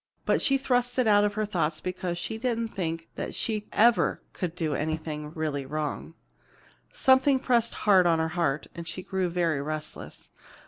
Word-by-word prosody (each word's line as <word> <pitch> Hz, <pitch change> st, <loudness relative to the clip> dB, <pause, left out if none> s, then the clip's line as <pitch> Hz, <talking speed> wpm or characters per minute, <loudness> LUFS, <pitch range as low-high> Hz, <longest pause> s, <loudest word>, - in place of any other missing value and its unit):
But -, -, +2 dB
she 275 Hz, -, +3 dB
thrust 245 Hz, -2 st, 0 dB
it 255 Hz, -, +3 dB
out 205 Hz, -1 st, +5 dB
of 205 Hz, 0 st, 0 dB
her 215 Hz, 0 st, 0 dB
thoughts 165 Hz, -6 st, -1 dB
because 180 Hz, 0 st, -3 dB
she 220 Hz, +5 st, -4 dB
didn't 230 Hz, -2 st, -1 dB
think 165 Hz, -4 st, -4 dB
that -, -, -4 dB
she 215 Hz, -2 st, -2 dB
ever 225 Hz, -6 st, +3 dB
could 175 Hz, -2 st, -4 dB
do 160 Hz, -4 st, -1 dB
anything 155 Hz, -1 st, -3 dB
really 150 Hz, -3 st, -2 dB
wrong. 155 Hz, +3 st, -4 dB, 0.8 s
Something 265 Hz, +1 st, +4 dB
pressed 240 Hz, -3 st, +1 dB
hard 190 Hz, -4 st, +6 dB
on 165 Hz, -1 st, +4 dB
her 160 Hz, 0 st, 0 dB
heart, 160 Hz, -4 st, -1 dB
and 170 Hz, -1 st, -8 dB
she 185 Hz, +3 st, -5 dB
grew 190 Hz, -1 st, -1 dB
very 170 Hz, -4 st, 0 dB
restless. 155 Hz, +1 st, -6 dB
180 Hz, 175 wpm, -27 LUFS, 160-220 Hz, 0.8 s, hard